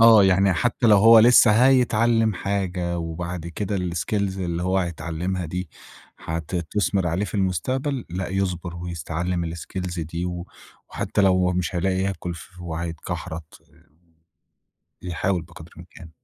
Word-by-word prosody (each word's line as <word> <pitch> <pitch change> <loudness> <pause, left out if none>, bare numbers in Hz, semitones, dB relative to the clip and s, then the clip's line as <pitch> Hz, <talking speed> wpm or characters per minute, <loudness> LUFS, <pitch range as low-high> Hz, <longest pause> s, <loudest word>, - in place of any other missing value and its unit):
آه، 115 -3 +8
يعني 95 +1 +4
حتّى 120 +6 0
لو 105 -2 +7
هو 115 +3 +8
لسّه 120 0 +7 0.2
هيتعلّم 115 -3 +3
حاجة 90 -3 -2
وبعد 85 +1 -5
كده 100 +4 -3
الskills 90 +2 -3 0.2
اللي 85 -2 -2
هو 95 +1 +1
هيتعلّمها 85 +1 -3
دي، 90 +2 -4 0.5
هت 80 +2 -5
تثمر 95 +2 0
عليه 85 +4 0
في - - -8
المستقبل، 120 - -1
لأ 90 +1 -3
يصبر 90 -2 -2
ويس 85 -1 -6
يتعلم 85 +2 -2
الskills 90 +1 -5
دي، 85 +2 -4
و 90 0 -5 0.4
وحتّى - - -1
لو 90 -2 +3
مش 90 +1 -2
هيلاقي 95 +1 0
ياكل 95 -2 -2
ف 90 +2 -13
وههيتكحرت 85 -1 -6 1.4
يحاول 90 0 -1
بقدر 85 -1 -13
الإمكان. 85 0 -13
90 Hz, 135 wpm, -23 LUFS, 85-100 Hz, 1.4 s, آه